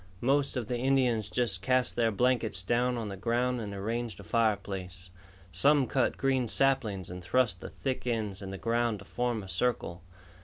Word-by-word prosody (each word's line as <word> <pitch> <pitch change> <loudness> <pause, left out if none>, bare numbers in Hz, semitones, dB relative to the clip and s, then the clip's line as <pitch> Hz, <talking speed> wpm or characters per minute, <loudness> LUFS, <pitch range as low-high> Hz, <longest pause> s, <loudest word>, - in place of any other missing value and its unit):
Most 140 +2 +1
of 120 - -2
the 120 +2 -2
Indians 125 -5 +2
just 115 -7 0
cast 125 +3 +2
their 115 -1 +2
blankets 115 -3 +1
down 120 +4 +1
on 110 -3 -3
the 100 - -5
ground 120 +4 0
and 105 -2 -5
arranged 115 +3 -3
a - - -9
fireplace. 95 -4 -1 0.4
Some 140 +9 +4
cut 130 0 0
green 130 -2 +1
saplings 110 -9 +1
and 90 0 -7
thrust 110 -2 +1
the - - -7
thick 130 -2 -4
ends 110 -4 -2
in 95 - -6
the 95 - -5
ground 115 0 0
to 100 - -13
form 120 -1 -2
a - - -10
circle. 95 -5 -1
115 Hz, 185 wpm, -30 LUFS, 100-125 Hz, 0.4 s, Some